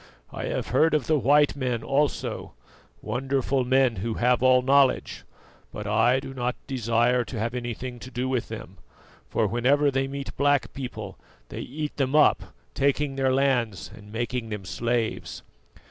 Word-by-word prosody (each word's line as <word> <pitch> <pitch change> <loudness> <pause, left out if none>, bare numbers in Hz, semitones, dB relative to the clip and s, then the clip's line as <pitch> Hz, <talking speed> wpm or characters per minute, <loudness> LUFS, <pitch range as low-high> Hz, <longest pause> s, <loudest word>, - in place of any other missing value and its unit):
I - - -4
have - - -3
heard 160 0 +3
of 150 - 0
the 155 -2 +2
white 145 +3 +4
men 125 -4 -2
also 145 +1 -1 0.5
wonderful 135 0 0
men 130 -2 +2
who 110 +4 -3
have 125 0 +2
all 130 0 +5
knowledge; 135 0 +2 0.5
but 105 - -7
I 115 +5 +3
do 135 0 -8
not 125 -1 -2
desire 120 0 +1
to 125 - -7
have 115 +2 -2
anything 120 0 -5
to 125 - -9
do 125 0 -3
with 130 -3 -1
them, - - -8 0.5
for - - +1
whenever 140 +5 +2
they 135 0 0
meet 140 0 -6
black 145 -1 +2
people 110 -7 -7 0.3
they - - -7
eat 150 +3 -5
them 135 0 0
up, 155 - +5 0.3
taking 140 0 0
their 135 -1 +1
lands 125 - 0
and 105 -1 -14
making 120 +1 -3
them 105 -3 -5
slaves. 115 +3 -2
130 Hz, 160 wpm, -26 LUFS, 120-135 Hz, 0.5 s, all